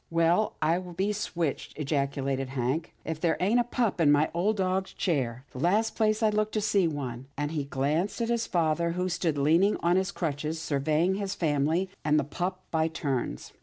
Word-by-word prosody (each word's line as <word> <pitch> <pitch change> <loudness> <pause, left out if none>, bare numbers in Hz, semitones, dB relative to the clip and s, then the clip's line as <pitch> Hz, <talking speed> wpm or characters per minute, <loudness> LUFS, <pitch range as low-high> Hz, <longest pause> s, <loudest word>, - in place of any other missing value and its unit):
''Well, 170 +6 +2
I 165 +3 +3
be 185 +3 -2
switched!" 170 -7 -3
ejaculated 140 -2 -1
Hank, 135 +4 -2
''if 160 0 -3
there 165 0 +1
ain't 210 +7 +3
a - - +4
pup 235 -6 -1
in 145 -3 +5
my 145 +2 +3
old 200 +6 +1
dad's 190 0 0
chair 130 - -1
— - - -34
the 125 - -8
last 205 - +2
place 215 0 +1
I'd 215 -1 +3
look 215 0 +1
to 215 - +1
see 200 -4 +2
one," 135 -5 -5
and 145 +1 -2
he 150 -3 -2
glanced 145 - -1
at 230 0 -1
his 235 -1 0
father 170 0 +1
who 180 +1 -1
stood 170 -3 0
leaning 165 +9 +3
on 175 +2 +4
his 190 +1 +1
crutches, 155 -4 -3
survey 155 +1 +1
ing 185 +2 +2
his 200 -1 -3
family, 160 +3 +1 0.2
and 150 0 +3
the - - +1
pup 180 +6 -3
by 160 -1 +2
turns. 135 - -3
165 Hz, 205 wpm, -28 LUFS, 145-190 Hz, 0.2 s, in